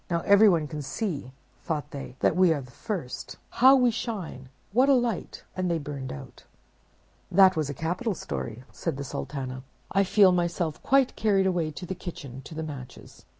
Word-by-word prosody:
'Now 170 -1 0
everyone 200 -5 +5
can 150 0 -5
see,' 145 - -4 0.3
thought 150 -2 -3
they, 140 -3 -7
'that - - +3
we 185 -2 +5
are 150 -3 0
the 125 -2 -13
first. 175 - -5 0.2
How 265 +2 +9
we 250 -2 +4
shine! 190 - -5 0.2
what 255 +5 +4
a 275 - +7
light!'—and 220 -5 -2
they 170 - +1
burned 140 -3 -6
out." 70 - -10 0.9
"That 190 0 +6
was 155 -3 -1
a 145 - -4
capital 180 - -2
story," 75 - -5
said 165 -5 -3
the 140 - -4
Sultana. 130 -1 -5 0.3
"I 195 - +3
feel 195 0 +5
myself 175 -3 -1
quite 270 -1 +3
carried 200 -3 +2
away 175 -4 +1
to 175 +5 -7
the 190 - -3
kitchen, 140 -8 -8
to 160 - -9
the 160 - -3
Matches. 135 -5 -10
170 Hz, 180 wpm, -27 LUFS, 140-195 Hz, 0.9 s, How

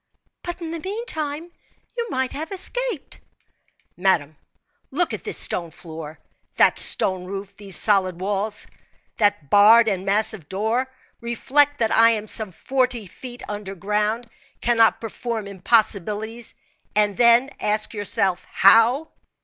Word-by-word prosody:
"But 350 0 -6
in 325 -1 -5
the 335 - -5
meantime 335 -5 -5 0.4
you 470 -1 -3
might 260 0 -1
have 315 +6 -6
escaped." 415 - -1 0.8
"Madame, 165 -5 0 0.5
look - - 0
at - - -6
this - - -2
stone 170 -2 0
floor, 160 -1 -10 0.4
that - - +4
stone 185 -1 +3
roof, 195 +1 -7
these 195 -3 +1
solid 190 -4 +2
walls, 205 +2 -2 0.5
that 205 -9 0
barred 220 +3 +7
and 190 -3 -1
massive 200 -4 +1
door; 225 +7 -1 0.3
reflect 280 +5 +1
that 225 -1 0
I 230 0 +6
am 215 -2 -2
some 215 -2 -2
forty 250 +2 -2
feet 245 +7 -10
under 205 -2 -6
ground 210 +5 -2 0.3
cannot 230 -2 +2
perform 225 -1 -5
impossibilities, 215 +2 0 0.4
and 210 -1 +2
then 240 +4 +4
ask 215 +1 0
yourself 195 -3 0
how?" 230 +10 +4
220 Hz, 130 wpm, -22 LUFS, 195-250 Hz, 0.8 s, barred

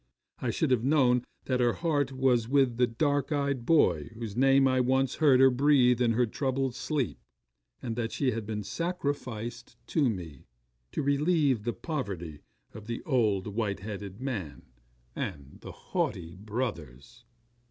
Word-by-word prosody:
I - - -2
should - - 0
have 120 -3 +2
known 130 -3 +3 0.2
that 130 -1 0
her 120 -1 +3
heart 145 -5 0
was 130 -3 +1
with 135 -4 +3
the 125 0 +3
dark 145 +4 0
eyed 140 -4 -1
boy 90 - +3
whose 110 -3 -6
name 135 +1 +5
I 130 0 +2
once 130 +1 +1
heard 140 -5 +5
her 130 0 +7
breathe 125 -2 +4
in 115 -2 +3
her 125 +2 +3
troubled 130 +2 -1
sleep; 140 -1 -2 0.6
and 115 -3 -3
that 115 -1 -2
she 135 -3 0
had 110 -2 -4
been 105 -1 -3
sacrificed 125 - -4
to 145 -6 +2
me, 85 - -7 0.5
to - - -1
relieve 140 -3 +2
the 120 - -1
poverty 95 - -5 0.3
of 110 0 -10
the 115 0 -4
old, 110 -9 +1
white 105 -2 -2
headed 100 -1 -7
man 110 - -5 0.5
and 70 -1 -6
the - - -8
haughty 85 -1 -3
brothers. 100 - -5
125 Hz, 155 wpm, -29 LUFS, 105-135 Hz, 0.6 s, her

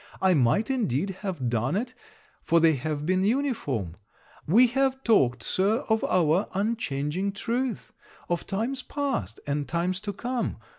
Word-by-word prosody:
I 190 -1 +4
might, 145 - +2
indeed 195 - 0
have 180 -11 -3
done 120 +6 0
it, 250 +5 -2 0.5
for 170 - +3
they 165 -1 +5
have 150 +2 -3
been 185 +2 +2
uniform. 200 - -1 0.5
We 225 +11 +6
have 265 +2 0
talked, 125 - +3
Sir, 205 +6 +1
of 220 0 +2
our 175 +1 +2
unchanging 195 -4 -1
truth. 235 +2 -3 0.3
Of 175 -1 -2
times 230 +7 -2
past, 280 -2 -3
and 145 0 -2
times 175 +2 -1
to 205 - -4
come. 245 +5 -3
190 Hz, 145 wpm, -26 LUFS, 150-235 Hz, 0.5 s, We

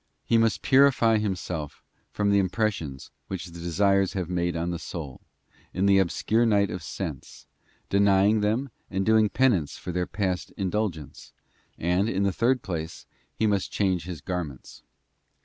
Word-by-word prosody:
He 115 - +3
must 115 -1 +1
purify 130 -5 +4
himself 90 -7 -4 0.3
from 105 -1 0
the 100 - +4
impressions 95 -8 -2 0.2
which 95 -2 -5
the 85 -1 -10
desires 95 +3 +2
have 90 -2 -3
made 85 -1 -1
on 85 +1 -2
the 85 - -4
soul, 75 -7 -7 0.5
in 95 +2 +1
the 100 -1 +5
obscure 105 +5 +1
night 100 -3 +2
of 90 - -5
sense, 80 -5 -7 0.4
denying 100 +2 +3
them 115 +6 0 0.2
and 95 0 -1
doing 110 -1 +4
penance 100 - +1
for 90 - -6
their 90 0 -1
past 95 -3 -2
indulgence, 95 -6 -3 0.4
and, 90 +5 +1
in 100 -2 0
the 100 -1 +1
third 125 +5 +1
place, 80 -3 -5 0.3
he 110 - 0
must 100 -3 0
change 95 -4 0
his 90 -5 -7
garments. 80 -8 -6
95 Hz, 155 wpm, -26 LUFS, 85-105 Hz, 0.5 s, the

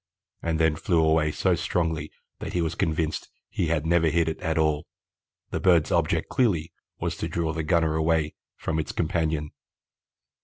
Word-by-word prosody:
and 80 -1 -1
then 80 -1 +3
flew 85 +2 +1
away 80 -1 +3
so - - +1
strongly 80 -4 -1 0.3
that - - -5
he 90 - +1
was 80 - -1
convinced 80 0 -1 0.2
he 85 - 0
had 80 -1 0
never 85 0 +3
hit 80 +1 +2
it 80 - -2
at 80 -2 -1
all. 75 -2 +1 0.6
The - - -1
bird's 85 -4 +4
object - - +1
clearly 90 -11 +1 0.3
was - - -2
to - - -2
draw 80 -2 -1
the 80 - -2
gunner 80 0 +2
away 80 -1 +1 0.2
from 80 0 -2
its 75 - -2
companion." 80 -2 -1
80 Hz, 170 wpm, -26 LUFS, 80-85 Hz, 0.6 s, bird's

